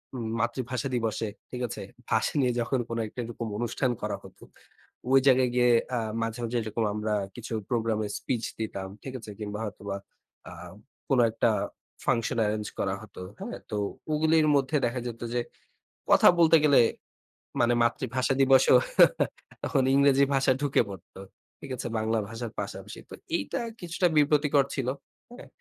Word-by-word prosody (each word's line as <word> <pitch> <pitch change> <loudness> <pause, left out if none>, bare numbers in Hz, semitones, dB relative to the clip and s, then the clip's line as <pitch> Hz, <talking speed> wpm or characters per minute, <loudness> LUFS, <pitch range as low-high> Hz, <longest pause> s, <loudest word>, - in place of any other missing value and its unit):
ম - - -4 0.2
মাতৃভাষা 125 +2 -2
দিবসে 115 -1 -1 0.2
ঠিক 125 - -5
আছে, - - -7 0.3
ভাষা - - +1
নিয়ে 125 -2 +3
যখন 120 +2 0
কোনো 115 - -2
একটা 125 - -11
এরকম 115 0 -5
অনুষ্ঠান 120 +2 0
করা - - -2
হতো, - - -15 0.7
ওই 135 - +8
জায়গায় 130 -1 +5
গিয়ে 125 0 +4 0.3
আ - - +1 0.2
মাঝে, 115 +1 -3
মাঝে 120 +1 -1
এরকম 110 +1 -2
আমরা 105 0 -2 0.2
কিছু 115 -1 -7 0.2
প্রোগ্রামের 110 -3 0
স্পিচ 120 -3 -2 0.2
দিতাম 100 -3 -4 0.2
ঠিক 130 - -6
আছে 110 -2 -9
কিংবা 105 0 -5
হয়তোবা 100 -1 -5 0.5
আম 90 +1 -10 0.4
কোনো 130 -3 +4
একটা 115 - +2 0.6
ফাংশন 120 0 +1
এরেঞ্জ 105 0 -1
করা 95 -1 0
হতো 105 -3 -11 0.2
হ্যাঁ, - - -6
তো 105 - -2 0.3
ওগুলির 155 +1 +3
মধ্যে 140 +2 +2
দেখা 120 +1 -1
যেত 115 -1 -7
যে 120 - +1 0.7
কথা - - +7
বলতে 165 -1 +6
গেলে 145 -2 +6 0.8
মানে 120 0 +4
মাতৃভাষা 130 +2 0
দিবসেও 135 -1 +6 0.9
তখন 135 - +1
ইংরেজি 140 0 +5
ভাষা 135 0 +3
ঢুকে 145 -3 +3
পড়ত। 95 -4 -11 0.5
ঠিক - - -8
আছে 120 - -4
বাংলা 110 +1 0
ভাষার 115 0 -6
পাশাপাশি। - - -6
তো - - -10 0.2
এইটা 100 - -3 0.2
কিছুটা 175 +1 +1
বিব্রতকর 145 -1 +4
ছিল। 130 -3 -2 0.5
হ্যাঁ? - - -11
120 Hz, 155 wpm, -27 LUFS, 110-135 Hz, 0.9 s, ওই